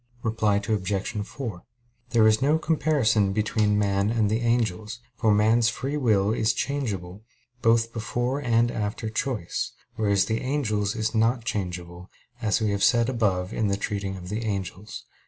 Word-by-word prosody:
Reply 110 -2 +1
Obj. 100 0 -1
4: 115 -10 -6 0.5
There 115 -3 +4
is 110 +2 +4
no 150 +4 +3
comparison 140 -11 +2
between 105 0 +1
man 100 0 +1
and 110 -2 +1
the 110 - +1
angels; 115 -2 0 0.2
for 115 -3 +2
man's 110 +3 +4
free 135 +4 -3
will 110 -8 +2
is 110 -1 +1
changeable, 110 -9 -3 0.4
both 115 0 +3
before 120 +4 -2
and 120 -2 +2
after 110 +1 -3
choice; 115 -6 -2 0.2
whereas 100 -3 +2
the 110 +2 -1
angel's 110 -7 -1
is 110 0 -1
not 115 +2 +1
changeable, 90 -3 -4 0.3
as 105 -3 +1
we 105 -2 +1
have 100 -1 -1
said 120 0 +4
above 100 -7 0
in 110 -2 0
treating 100 -2 -3
of 90 -1 -9
the 110 +3 -3
angels 100 -1 -4
(Q. - - -35
110 Hz, 155 wpm, -25 LUFS, 100-120 Hz, 0.5 s, There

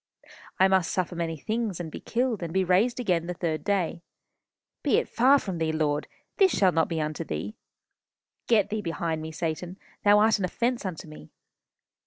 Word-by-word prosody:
I 190 - +6
must 190 -3 +2
suffer 185 -1 -1
many 165 -1 -3
things, 215 +2 -2
and 165 -2 -5
be - - -7
killed, 240 -3 -1
and 170 -2 -4
be 190 +2 +2
raised 200 +8 +2
again 175 -8 0
the 180 - -3
third 160 -3 -2
day.... 185 -4 -1 0.8
Be - - +2
it - - 0
far 260 +4 +5
from 190 -10 -4
thee, 160 -1 0
Lord. 150 -1 0 0.3
This 385 -2 +4
shall 190 -2 +4
not 165 -2 +2
be 165 -2 -2
unto 155 0 -2
thee.... 80 +7 -5 0.9
Get 215 -4 +3
thee 215 0 -1
behind 165 -2 -2
me, 160 0 -6
Satan. 170 +3 -4 0.3
Thou 205 0 +6
art 215 0 +4
an 190 - 0
offence 235 +3 -1
unto 165 -3 -6
me. 155 - -12
180 Hz, 190 wpm, -27 LUFS, 160-210 Hz, 0.9 s, I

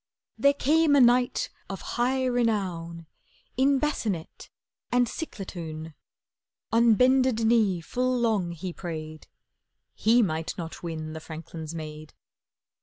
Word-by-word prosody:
There 280 0 +3
came 305 +1 +3
a - - +6
knight 245 0 +3 0.2
of 195 - -5
high 255 +2 +1
renown 190 -9 -1 0.5
In 275 +2 +3
bassinet 225 - -3 0.4
and 245 0 +4
ciclatoun; 165 - -6 0.8
On 230 0 +5
bended 255 -2 +3
knee 215 -6 +3
full 255 +8 -1
long 215 -7 +1
he 170 +2 -6
prayed— 155 -3 -7 0.7
He 235 +2 +4
might 160 -4 -2
not 165 -2 -6
win 155 -2 -5
the 160 - -6
franklin's 160 0 -8
maid. 155 -1 -8
205 Hz, 115 wpm, -27 LUFS, 165-250 Hz, 0.8 s, a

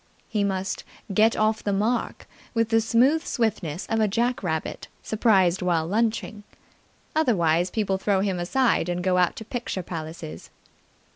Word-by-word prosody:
He 210 -2 0
must 190 -1 -2 0.3
get 220 +3 +4
off 215 0 +1
the 205 - 0
mark 215 +5 -1 0.3
with 230 -1 +2
the 225 0 +4
smooth 255 +8 +3
swiftness 195 -8 -2
of 225 - -1
a 215 - +3
jack 240 +5 0
rabbit 160 -5 -3 0.2
surprised 195 -5 +3
while 170 -3 +1
lunching. 215 +2 -1 0.7
Otherwise, 175 - +2
people 195 -2 -1
throw 195 -1 +1
him 195 -3 -1
aside 230 0 +1
and 175 0 -2
go 185 0 +2
out 180 - +2
to 220 - -8
picture 230 -6 -4
palaces. 160 - -7
200 Hz, 150 wpm, -25 LUFS, 180-225 Hz, 0.7 s, get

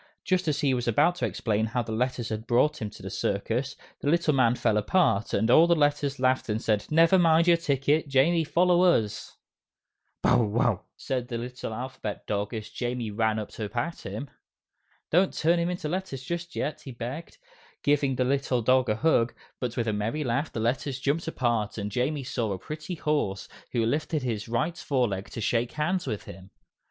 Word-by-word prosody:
Just 185 -2 0
as 150 0 0
he 140 -3 +2
was 120 -1 -2
about 145 +9 +4
to - - 0
explain 110 -1 -1
how 120 +2 -1
the 110 - -7
Letters 120 +1 -1
had 110 +1 -5
brought 140 +6 +2
him 105 - -2
to 100 - -13
the 95 - -6
circus, 115 +9 -1 0.2
the 145 - -1
little 165 -1 +3
man 125 -3 +3
fell 110 -3 +1
apart, 110 - +2
and 110 +4 +2
all 165 +6 +7
the 170 - +4
Letters 145 -2 +1
laughed 130 -1 +1
and 105 +1 0
said, 105 -2 0
"Never 165 +4 +5
mind 165 0 +4
your 170 - +7
ticket, 145 -1 +1
Jamie 150 +5 +3
follow 175 +3 +3
us!" 115 - +1 0.9
"Bow - - +5
wow!" 110 -2 +1
said 125 -2 -3
the 120 -1 -3
little 125 0 -6
Alphabet 125 -2 -5
Dog 105 0 -2
as 110 -3 -5
Jamie 120 -3 -3
ran 110 +1 +1
up 105 -2 -4
to 105 -2 -5
pat 140 +10 -3
him. 140 -2 -6 0.8
"Don't 180 +4 +3
turn 170 +2 +2
into 175 -1 -2
letters 170 -6 -4
just 170 +4 -5
yet," 150 - -3
he 135 - -8
begged, 125 +7 -7 0.5
giving 145 -2 +2
the 125 - +1
little 130 -2 0
dog 130 +2 +3
a 105 - +2
hug, 120 -3 +2 0.2
but 125 -1 -3
with 115 -1 0
a 110 - +1
merry 110 +9 -2
laugh 135 +4 -1
the - - -4
Letters 130 +4 -1
jumped 145 +5 -1
apart 120 -9 -1
and 105 -1 -3
Jamie 135 +6 -1
saw 120 -4 -2
a - - -4
pretty 150 - -6
horse, 145 - -1 0.2
who 115 -2 +1
lifted 150 +4 -1
his 110 -4 -3
right 155 +9 -1
fore 130 -4 +1
leg 95 0 -5
to 115 - -6
shake 115 +2 0
hands 175 +4 -1
with 105 - -3
him. 95 +2 -11
130 Hz, 200 wpm, -27 LUFS, 115-155 Hz, 0.9 s, all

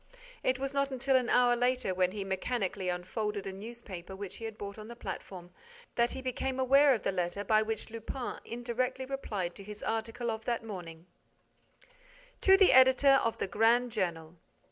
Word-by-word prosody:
It 255 0 +1
was 270 +1 -3
not 275 0 +1
until 265 0 0
an 250 -2 +2
hour 245 -1 +4
later, 250 -4 +1
when 185 0 +2
he 200 0 -4
mechanically 190 -1 -2
unfolded 200 +3 -3
a 195 - -4
newspaper 195 -3 -8
which 195 -1 -6
he 225 - -7
had 220 -1 -6
bought 200 0 -7
on 215 - -9
the 235 - -9
platform, 180 -6 -7 0.4
that 235 0 +2
he 265 - -6
became 260 +1 -2
aware 275 +1 +5
of 220 - -6
the - - +1
letter 180 +2 -2
by 215 +1 +3
which 220 0 -2
Lupin 230 +3 -5
indirectly 250 +2 -3
replied 210 -10 -3
to 200 - -10
his 210 +1 -9
article 225 +1 -2
of 220 0 -5
that 235 -2 -1
morning: 175 -6 -8 1.4
_To 385 0 +7
the 385 -1 +6
Editor 260 +1 +6
of 230 - 0
the - - -1
Grand 230 +5 +3
Journal. 170 -6 -3
225 Hz, 185 wpm, -31 LUFS, 195-255 Hz, 1.4 s, To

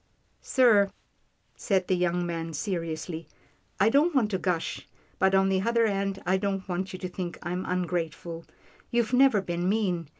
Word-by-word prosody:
" - - -41
Sir," 220 -7 +4 0.7
said 190 -3 0
the 185 - +2
young 175 0 0
man, 165 -1 -4
seriously, 165 -1 -4 0.3
" - - -37
I 205 +3 +5
don't 295 +6 +3
want 225 -5 +2
to 190 - 0
gush, 175 -2 -2 0.3
but 190 0 +4
on 195 0 +4
the 190 -1 +2
other 235 +2 +2
hand, 195 -2 -1
I 185 +2 +2
don't 195 -1 -2
want 185 +1 -3
you 185 - -6
to 185 - -5
think 180 -1 -5
I'm 180 +1 -3
ungrateful. 170 -2 -3 0.5
You've 235 0 0
never 250 -5 +5
been 175 0 -1
mean. 185 -7 0
185 Hz, 175 wpm, -27 LUFS, 175-205 Hz, 0.7 s, I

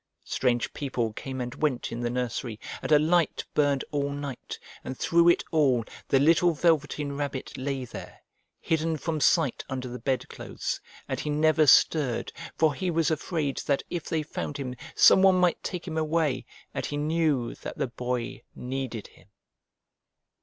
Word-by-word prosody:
Strange 120 -2 0
people 120 -6 -2
came 130 +3 -6
and 125 0 -3
went 145 -6 -1
in 115 - -4
the 120 0 -1
nursery, 120 -2 -3 0.2
and - - -4
a 150 - +8
light 165 +2 +2
burned 145 -2 +2
all 140 -1 0
night 140 -2 -6 0.3
and 130 - -6
through 170 0 +4
it 170 - +3
all 135 -8 +3 0.2
the 135 - +4
little 165 +5 +4
Velveteen 150 -3 +1
Rabbit 140 -2 -4
lay 135 -1 -3
there, - - -10 0.4
hidden 160 0 0
from 155 +1 -2
sight 150 -3 +3
under 130 -1 -3
the 125 0 -6
bedclothes, 130 +2 -3 0.3
and - - -3
he 150 - -3
never 155 +1 +3
stirred, 140 -4 +4 0.2
for 160 -2 +3
he 185 +4 -2
was 165 -1 +1
afraid 155 -2 -1
that 140 -1 +1
if 175 -3 -3
they 160 -1 -1
found 145 -1 -5
him 130 -3 -4 0.2
some - - +7
one 190 -1 +6
might 180 -1 +2
take 180 0 -5
him 160 -2 -2
away, 155 -4 0 0.3
and - - -3
he 145 - -3
knew 150 -5 +1
that - - -8
the - - 0
Boy 125 0 -4
needed 125 -3 -4
him. - - -18
145 Hz, 165 wpm, -27 LUFS, 130-160 Hz, 0.4 s, a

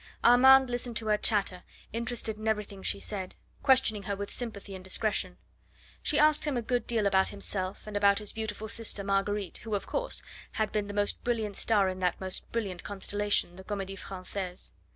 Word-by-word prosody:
Armand 260 +2 +7
listened 245 -1 -2
to 225 - -1
her 210 -1 +3
chatter, 195 -5 +1 0.3
interested 230 -1 -1
in 215 +1 -5
everything 210 -2 -1
she - - 0
said, 190 -3 -5 0.3
questioning 260 -6 +4
her 200 0 -3
with 200 0 -5
sympathy 210 -5 -4
and 190 -1 -8
discretion. 190 -1 -1 0.6
She 300 - +1
asked 305 0 +5
him 290 -4 0
a 240 - -1
good 245 +1 -1
deal 225 -3 +1
about 190 -1 +4
himself, 195 -1 -3
and 210 -1 -7
about 200 0 +4
his 210 -2 -1
beautiful 220 -1 -4
sister 220 -2 0
Marguerite, 195 -1 -1
who, 220 -2 -3
of 200 - -3
course, - - -1 0.3
had 215 -1 0
been 210 -1 -1
the 205 - -6
most 205 0 0
brilliant 220 -4 -1
star 205 -3 +3
in 185 0 -3
that 180 -1 0
most 185 -1 -4
brilliant 200 -6 -3
constellation, 205 -2 0
the 190 - -9
Comedie 195 -1 -4
Francaise. 185 -1 -5
205 Hz, 190 wpm, -30 LUFS, 195-225 Hz, 0.6 s, Armand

